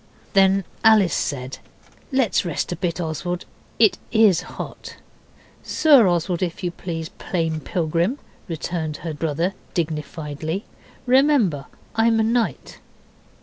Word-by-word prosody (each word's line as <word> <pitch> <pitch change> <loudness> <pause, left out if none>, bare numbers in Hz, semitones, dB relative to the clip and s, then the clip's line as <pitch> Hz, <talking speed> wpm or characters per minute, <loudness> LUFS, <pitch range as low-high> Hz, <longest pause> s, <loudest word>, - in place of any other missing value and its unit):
Then 195 0 +4 0.2
Alice 215 -5 +5
said, 130 -2 -3 0.5
'Let's 260 -6 +2
rest 170 -5 -2
a - - -1
bit, 175 0 -2
Oswald, 175 +2 -3 0.3
it 220 -4 +4
IS 220 -6 +5 0.2
hot.' - - -7 0.7
'Sir 280 -9 +5
Oswald, 175 0 0
if 180 +1 -3
you 175 - -1
please, 165 -2 -5
Plain 165 -3 -1
Pilgrim,' 170 - -1 0.3
returned 160 -2 -3
her 160 - -2
brother 160 +4 -1 0.2
dignifiedly. 160 +1 -3 0.4
'Remember 250 - +3 0.3
I'm 225 0 +3
a - - +3
knight. 225 - -1
175 Hz, 115 wpm, -22 LUFS, 160-215 Hz, 0.7 s, Alice